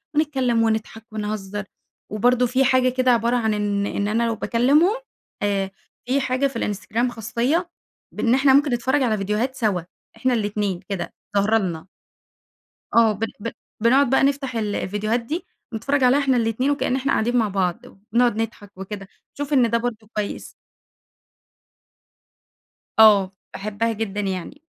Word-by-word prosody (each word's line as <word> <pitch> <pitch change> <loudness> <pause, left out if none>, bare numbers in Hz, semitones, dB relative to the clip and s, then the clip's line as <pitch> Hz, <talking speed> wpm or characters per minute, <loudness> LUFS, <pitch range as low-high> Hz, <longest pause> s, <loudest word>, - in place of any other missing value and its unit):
ونتكلم 260 -7 +2
ونضحك 220 0 -2
ونهزّر، 210 -1 -4 0.5
وبرضه 245 +3 +3
في 260 +2 +2
حاجة 255 -1 +4
كده 255 0 +2
عبارة 235 +1 +2
عن 220 -2 +1
إن 205 -1 0
إن 205 0 -2
أنا 220 +3 +1
لو 225 - -1
باكلمهم، 285 - +3 0.5
آآ 195 -1 0 0.3
في 265 +3 +1
حاجة 260 +1 +1
في 260 -4 -5
الInstagram 225 +4 -1
خاصية 255 - -1 0.5
إن 235 - +3
إحنا 270 0 +4
ممكن 280 -1 +4
نتفرج 260 +4 +1
على 220 -4 +1
فيديوهات 210 +6 -1
سوا، 210 -8 0 0.4
إحنا 255 +3 +1
الاتنين 205 -4 -1
كده، 195 -3 -4 0.2
ظاهرة 210 +3 +3
لنا. 175 -5 -3 1.1
آه 230 -2 +6
ب 210 +2 -4 0.2
ب 230 +2 -4 0.3
بنقعد 265 +3 +5
بقى 270 +1 +3
نفتح 275 -2 0
ال 210 -2 -1
الفيديوهات 215 +4 -1
دي، 305 +10 -5 0.3
بنتفرّج 265 +5 0
عليها 255 +3 +5
إحنا 270 -3 +2
الاتنين، 230 +4 +1
وكأن 285 -3 0
إحنا 270 +1 -1
قاعدين 240 +3 +1
مع 225 -3 +3
بعض، 185 -3 -1 0.3
ونُقعد 240 -2 +3
نضحك 210 -3 -6
وكده، 195 0 -7 0.3
شوف 290 +1 -4
إن 250 -4 +4
ده 235 - +2
برضه 230 -2 -4
كويس. 210 -1 -4 2.5
آه، 205 -4 +7 0.2
باحبّها 215 +3 -2
جدًا 210 -2 -3
يعني، 195 - -4
230 Hz, 150 wpm, -22 LUFS, 210-255 Hz, 2.5 s, آه